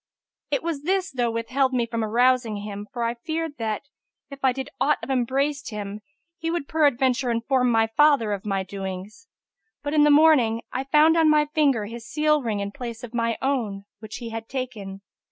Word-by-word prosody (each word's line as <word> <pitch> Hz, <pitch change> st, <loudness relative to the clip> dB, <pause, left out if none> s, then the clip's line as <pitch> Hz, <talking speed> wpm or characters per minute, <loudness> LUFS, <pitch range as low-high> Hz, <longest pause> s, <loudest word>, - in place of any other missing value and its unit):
It -, -, -1 dB
was 330 Hz, -4 st, -2 dB
this 375 Hz, +4 st, 0 dB
though 245 Hz, -3 st, 0 dB
withheld 255 Hz, +4 st, 0 dB
me 240 Hz, -2 st, +1 dB
from 230 Hz, -1 st, -3 dB
arousing 240 Hz, 0 st, +2 dB
him, 205 Hz, 0 st, -6 dB
for 240 Hz, -, -3 dB
I 230 Hz, 0 st, 0 dB
feared 315 Hz, +4 st, -4 dB
that, 220 Hz, -2 st, -2 dB, 0.5 s
if 275 Hz, 0 st, -10 dB
I 260 Hz, -, +5 dB
did 265 Hz, +1 st, -6 dB
aught 300 Hz, +1 st, +3 dB
of -, -, -4 dB
embraced 270 Hz, +3 st, 0 dB
him, 210 Hz, -1 st, -6 dB, 0.4 s
he 325 Hz, -, -2 dB
would 335 Hz, -4 st, -2 dB
peradventure 265 Hz, -4 st, +2 dB
inform 250 Hz, +2 st, +1 dB
my 225 Hz, -1 st, +3 dB
father 235 Hz, -1 st, +3 dB
of 200 Hz, -, -4 dB
m, 195 Hz, -1 st, -1 dB
doings. 195 Hz, -, -7 dB, 0.6 s
But 290 Hz, 0 st, -3 dB
in 305 Hz, -, +4 dB
the 295 Hz, -, +5 dB
morning, 290 Hz, -7 st, +5 dB
I 265 Hz, -, -2 dB
found 305 Hz, +4 st, +5 dB
on 320 Hz, -1 st, +5 dB
my 300 Hz, 0 st, +4 dB
finger 275 Hz, -9 st, +2 dB
his 230 Hz, +2 st, -9 dB
seal 300 Hz, 0 st, +2 dB
ring, 215 Hz, -5 st, -2 dB
in 200 Hz, 0 st, -4 dB
place 235 Hz, 0 st, -7 dB
of 240 Hz, -1 st, -8 dB
my 230 Hz, -1 st, 0 dB
own 225 Hz, -8 st, -1 dB
which 215 Hz, -1 st, -9 dB
he 235 Hz, -2 st, -6 dB
had 225 Hz, 0 st, -6 dB
taken. 215 Hz, -7 st, -5 dB
245 Hz, 195 wpm, -24 LUFS, 225-290 Hz, 0.6 s, I